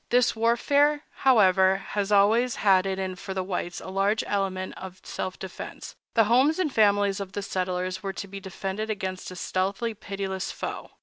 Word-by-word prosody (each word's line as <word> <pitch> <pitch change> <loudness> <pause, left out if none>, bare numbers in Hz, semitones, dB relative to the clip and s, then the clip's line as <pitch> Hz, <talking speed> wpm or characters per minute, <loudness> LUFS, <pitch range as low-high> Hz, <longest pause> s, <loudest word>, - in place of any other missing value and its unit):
This 245 -1 +3
warfare, 285 +6 +3
however, 195 -6 +4 0.3
always 220 +5 +4
had 190 -2 +3
in 190 0 -2
it 180 - -10
for 190 - -6
the 190 - -1
whites 180 -1 -3
a - - -9
large 195 +3 +1
element 190 -2 -2
of 185 0 -9
self 185 - -5
defense—the 190 +4 -3
homes 255 +8 +3
and 340 -7 0
families 205 -2 +3
of 195 -1 -6
the 205 - -3
settlers 185 -1 -2
were 195 -1 -4
to 200 - -6
be 200 +1 -7
defended 195 +2 -4
against 190 -3 -4
a 185 - -9
stealthy 195 +6 -1
and 215 - -14
pitiless 195 -1 -4
foe. - - -6
195 Hz, 175 wpm, -26 LUFS, 190-220 Hz, 0.3 s, however